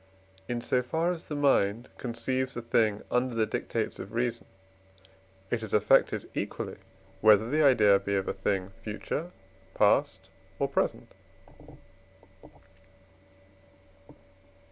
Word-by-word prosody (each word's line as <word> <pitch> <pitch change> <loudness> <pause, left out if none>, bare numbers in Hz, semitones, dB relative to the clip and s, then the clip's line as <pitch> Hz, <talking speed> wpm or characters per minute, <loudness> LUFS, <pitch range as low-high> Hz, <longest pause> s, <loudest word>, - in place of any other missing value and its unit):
In 120 -1 -2
so 125 +1 +1
far 160 +7 0
as 170 -2 -6
the 150 - -5
mind 120 -5 +2
conceives 130 +2 -2
a 120 - -4
thing 110 -3 +1
under 125 0 0
the 110 -1 +2
dictates - - -3
of 95 +3 -8
reason, 120 0 -2 1.0
it 120 - 0
is 110 -2 -2
affected 105 - +3
equally, - - -4 0.4
whether 110 0 +5
the 150 +5 +1
idea 105 -8 +5
be 100 0 -2
of 95 -1 -1
a - - -1
thing 95 -1 -2
future, 125 +10 -4 0.5
past, - - +2 0.3
or - - 0
present. - - -2
115 Hz, 120 wpm, -28 LUFS, 105-130 Hz, 1.0 s, whether